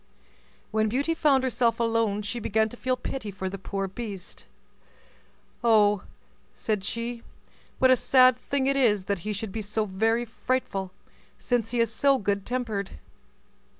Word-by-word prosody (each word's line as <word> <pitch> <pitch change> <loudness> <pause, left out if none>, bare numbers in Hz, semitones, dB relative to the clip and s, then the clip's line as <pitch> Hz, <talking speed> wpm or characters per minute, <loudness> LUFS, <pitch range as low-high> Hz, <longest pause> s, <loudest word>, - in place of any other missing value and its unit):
When 215 0 +1
Beauty 280 +8 0
found 285 -5 +3
herself 235 -2 +1
alone, 225 -3 +1
she 205 +4 -3
began 220 0 +1
to 245 - -9
feel 255 +1 -1
pity 250 -3 -5
for 190 -1 -4
the 195 +1 -7
poor 195 +1 -3
beast. 195 -2 -7 1.2
"Oh!" 210 -3 +4 0.5
said 210 -3 -2
she, 230 +3 -3 0.6
"what 260 0 +5
a - - +7
sad 255 0 +5
thing 265 +2 -2
it 275 +1 +2
is 220 -8 +3
that 200 -1 -1
he 210 +5 -4
should 210 0 -4
be 220 - -4
so 215 +1 -1
very 225 +5 +1
frightful, 220 -4 -2 0.5
since 240 -3 -1
he 240 - -1
is 230 -1 +2
so 275 +4 +3
good 200 -3 -1
tempered!" 225 - -3
225 Hz, 155 wpm, -26 LUFS, 205-250 Hz, 1.2 s, a